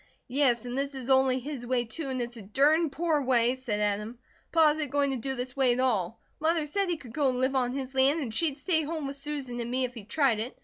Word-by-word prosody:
"Yes, 250 -4 +2
and 245 0 -4
THIS 275 +1 -2
is 265 0 -3
only 265 -1 +4
his 265 -1 -6
way, 245 0 0
too, 270 +6 -5
and 255 -2 -1
it's 240 0 -6
a 230 - -9
dern 295 - +3
poor 315 0 0
way," 245 -2 +4
said 250 -5 -3
Adam. 210 +3 -1 0.3
"Pa 325 -2 +5
isn't 300 -2 -2
going 280 0 +1
to - - -1
do 265 +3 -3
this 250 0 -5
way 265 -3 +3
at 245 - -3
all. 225 -5 0 0.2
Mother 320 0 +1
said 390 +5 -1
he 345 - 0
could 250 -6 -12
go 285 -1 +2
and 250 -1 -2
live 260 +1 +1
on 250 -1 +1
his 265 -1 -5
land, 270 +4 +3
and 250 -8 -4
she'd 290 +2 0
stay 320 +1 +1
home 310 0 -4
with 275 0 -4
Susan 275 -4 -5
and 235 0 -3
me, 255 +1 0
if 250 - -7
he 230 -4 -9
tried 240 0 +1
it. 235 +4 -5
265 Hz, 265 wpm, -28 LUFS, 245-290 Hz, 0.3 s, Pa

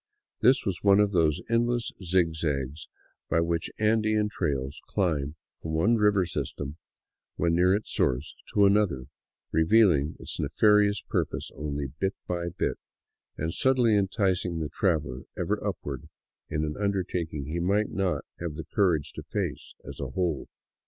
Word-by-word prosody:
This 130 +3 +4
was 95 -6 -2
one 100 0 +5
of 105 -1 +3
those 80 -5 +2
endless 120 0 +1
zigzags 80 -5 0 0.4
by 80 - +3
which 85 0 0
Andean 110 -1 +2
trails 70 -6 -2
climb 80 -7 0 0.3
from 80 - -4
one 100 +9 +3
river 105 -4 +3
system, 75 -1 -4 0.6
when 85 -1 +1
near 90 +3 +4
its 105 - -4
source, 65 +4 0 0.2
to 100 - +6
another, 100 -10 +3 0.5
revealing 80 -4 +4
its - - -4
ne - - 0
farious 105 +5 +3
purpose - - -2
only 75 0 -3
bit 95 +1 0
by 85 -1 -2
bit, - - -2 0.6
and 80 +2 -2
subtly 125 -4 +3
enticing 95 -3 +1
the 80 -2 -2
traveler 75 -9 -1
ever - - -1
up - - -1
ward 70 -3 -6 0.4
in 75 0 -1
an 75 0 -4
undertaking 90 -7 -1
he 80 +4 -3
might 100 +4 +1
not 95 -2 -1
have 85 -3 -4
the 80 -1 -6
courage 90 -8 +2
to - - -7
face - - -4
as - - -8
a - - -3
whole. 90 -6 -1
85 Hz, 150 wpm, -27 LUFS, 75-105 Hz, 0.6 s, to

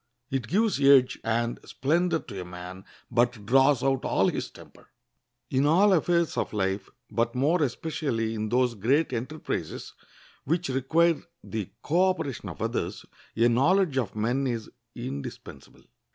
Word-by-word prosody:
It 130 -4 -2
gives 210 -2 +1
edge 135 -2 +5
and 115 +1 -1
splendor 165 +5 +1
to 105 -10 -8
a - - -5
man, 90 +1 -9 0.3
but 120 -3 +1
draws 135 +3 +4
out 135 -1 +1
all - - +2
his - - -3
temper. - - -16 0.6
In 135 +2 +2
all 190 +6 +5
affairs 170 -1 +1
of - - -2
life, 95 -1 -1 0.2
but 115 +2 0
more 150 +7 +2
especially 130 -4 -1
in 110 -1 -3
those 125 +1 +2
great 130 +8 +1
enterprises 130 +7 -4 0.5
which 165 +4 -1
require 160 +6 +2 0.2
the 105 -4 -4
co 180 +5 +3
operation 145 -8 -3
of - - -6
others, - - -3 0.3
a 115 +1 +4
knowledge 140 +5 +3
of 115 -5 -3
men 120 +6 0
is 115 -3 -4 0.2
indispensable. 70 +1 -8
130 Hz, 145 wpm, -27 LUFS, 115-155 Hz, 0.6 s, edge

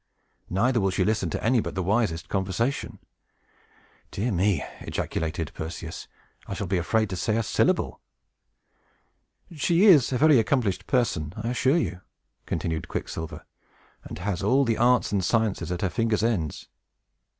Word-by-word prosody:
Neither 120 +6 +2
will 95 - +2
she 95 0 0
listen 105 -5 0
to - - -4
any 120 +2 +3
but - - -4
the 95 - -1
wisest 95 -4 0
conversation." 100 +7 -2 1.1
"Dear 115 +5 -2
me!" 95 -3 +1 0.2
ejaculated 80 -1 -3
Perseus; 80 +1 -6 0.4
"I 95 - -4
shall 100 - -3
be 95 0 0
afraid 110 +5 +1
to - - -2
say 110 +5 0
a 115 - +1
syllable." - - 0 1.5
"She 170 +5 +3
is 155 - +6
a 125 - +1
very 150 -1 +6
accomplished 105 -7 0
person, 90 - 0
I 115 +2 -3
assure 130 +5 +2
you," 90 - -2 0.5
continued 80 -1 -2
Quicksilver, 80 -1 -5 0.6
"and - - -8
has 90 -1 -3
all 130 +8 +3
the 115 -2 0
arts 125 -1 +3
and 100 -2 +1
sciences 110 -3 0
at 90 +1 -3
her 95 - +1
fingers' 115 -2 0
ends. 95 -10 -1
105 Hz, 150 wpm, -26 LUFS, 90-120 Hz, 1.5 s, is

